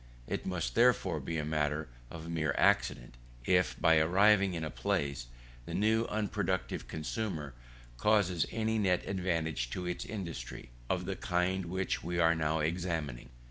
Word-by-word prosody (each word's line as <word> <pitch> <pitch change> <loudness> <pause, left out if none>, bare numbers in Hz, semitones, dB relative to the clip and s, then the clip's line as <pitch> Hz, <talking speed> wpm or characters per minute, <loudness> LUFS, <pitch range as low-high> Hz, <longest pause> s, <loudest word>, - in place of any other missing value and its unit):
It - - -3
must, 90 -2 -2
therefore, 115 -9 +3
be 80 +4 -3
a 75 - -1
matter 75 -1 0 0.2
of 80 0 -8
mere 80 -4 -1
accident, - - +2 0.3
if - - +2
by 80 0 +5
arriving 95 +3 +4
in 80 - -3
a 80 - -3
place, 65 +1 -1 0.4
the - - -4
new 110 +2 +2
unproductive 105 -3 -2
consumer 80 - -4 0.5
causes 95 -3 +3
any 110 0 0
net 90 -3 +2
advantage 85 -9 -1
to 90 +7 -4
its 90 0 -3
industry, 85 - -6 0.2
of 90 -1 0
the 95 +1 -2
kind 90 +1 0
which 95 +2 -2
we 85 +1 -2
are 85 -1 +5
now 80 -1 0
examining. 80 -6 -2
85 Hz, 150 wpm, -32 LUFS, 80-95 Hz, 0.5 s, by